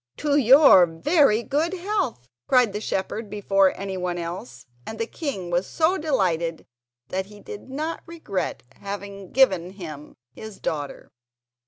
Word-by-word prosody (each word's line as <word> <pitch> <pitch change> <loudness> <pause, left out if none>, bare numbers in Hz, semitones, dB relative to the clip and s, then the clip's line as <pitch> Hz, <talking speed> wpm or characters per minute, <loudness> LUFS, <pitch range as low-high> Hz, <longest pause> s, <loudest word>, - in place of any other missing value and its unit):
"To 295 -1 0
your 265 - +7
very 235 - +3
good 310 +7 0
health," 360 - -2 0.2
cried 250 -5 +4
the 210 - -4
shepherd 210 +2 -3
before 195 -2 +2
anyone 185 -2 -3
else, 175 +7 -7 0.2
and 220 - -7
the 230 - -1
king 225 - -5
was 175 +2 0
so 330 +3 +2
delighted 175 - 0 0.4
that 190 +1 -3
he 210 0 -14
did 420 - -10
not 310 +5 -4
regret 320 - -4
having 200 -1 -7
given 190 -9 +3
him 155 -6 -9 0.2
his 220 - -10
daughter. 145 -3 -4
205 Hz, 140 wpm, -24 LUFS, 180-280 Hz, 0.4 s, your